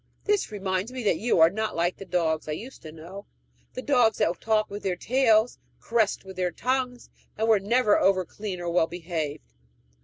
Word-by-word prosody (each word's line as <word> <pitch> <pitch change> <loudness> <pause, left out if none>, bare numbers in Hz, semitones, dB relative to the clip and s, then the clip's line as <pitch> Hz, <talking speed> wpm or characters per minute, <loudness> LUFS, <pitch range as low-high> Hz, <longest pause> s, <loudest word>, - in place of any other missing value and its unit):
This 415 - 0
reminds 195 +1 -2
me 255 -1 -5
that 205 - +1
you 225 -5 +1
are 165 +1 +7
not 220 +2 -3
like 175 +2 0
the 195 - -9
dogs 165 -4 -1
I 155 - -2
used 240 +12 -9
to 155 - -9
know 175 +6 -11 0.5
the 255 - -6
dogs 245 -6 +3
that 170 - 0
talked 215 -2 +1
with 205 +1 -6
their 185 -2 -1
tails, 235 0 +2 0.2
caressed 225 -4 0
with 190 -1 -10
their 180 -1 0
tongues, 250 +3 -2 0.3
and 220 +1 0
were 220 -2 +5
never 215 +2 +3
over 185 -1 +2
clean 195 +1 -6
or 175 -1 -3
well 170 -1 +3
behaved. 160 - -5
200 Hz, 195 wpm, -26 LUFS, 175-225 Hz, 0.5 s, are